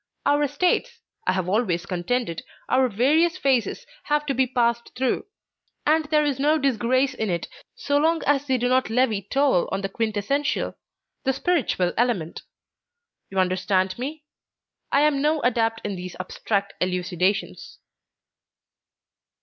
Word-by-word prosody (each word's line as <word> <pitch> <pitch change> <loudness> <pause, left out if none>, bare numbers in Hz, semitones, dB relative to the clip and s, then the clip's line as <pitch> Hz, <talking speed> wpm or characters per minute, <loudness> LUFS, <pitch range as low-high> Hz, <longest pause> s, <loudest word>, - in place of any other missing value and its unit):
Our 290 0 +3
states, 365 - 0 0.3
I - - +3
have 185 -2 -1
always 190 -3 0
contended, 180 0 -2 0.3
our 260 -1 +3
various 305 - +2
phases 265 -8 0 0.2
have 295 0 +1
to 280 - 0
be 260 0 +2
passed 235 -2 0
through, 260 - -1 0.6
and 315 +1 +3
there 300 0 +2
is 280 -3 -1
no 300 +3 +3
disgrace 260 0 +1
in 220 -4 -2
it 170 -1 -2 0.3
so 285 - 0
long 325 +2 +2
as 285 0 +2
they 260 -1 +2
do 245 0 0
not 255 -1 +2
levy 225 -3 +2
toll 265 -2 +1
on 195 - -1
the 195 - -3
quintessential, 225 +7 -1 0.5
the 265 - +1
spiritual 270 - 0
element. 225 -10 0 0.9
You 195 - -7
understand 185 +1 +1
me? 295 +4 -5 0.7
I 280 - +4
am 295 -2 +3
no 305 +2 +2
adept 225 -2 +1
in 205 -1 -3
these 180 0 -7
abstract 200 +2 -2
elucidations." 180 +1 -1
250 Hz, 140 wpm, -24 LUFS, 195-285 Hz, 0.9 s, I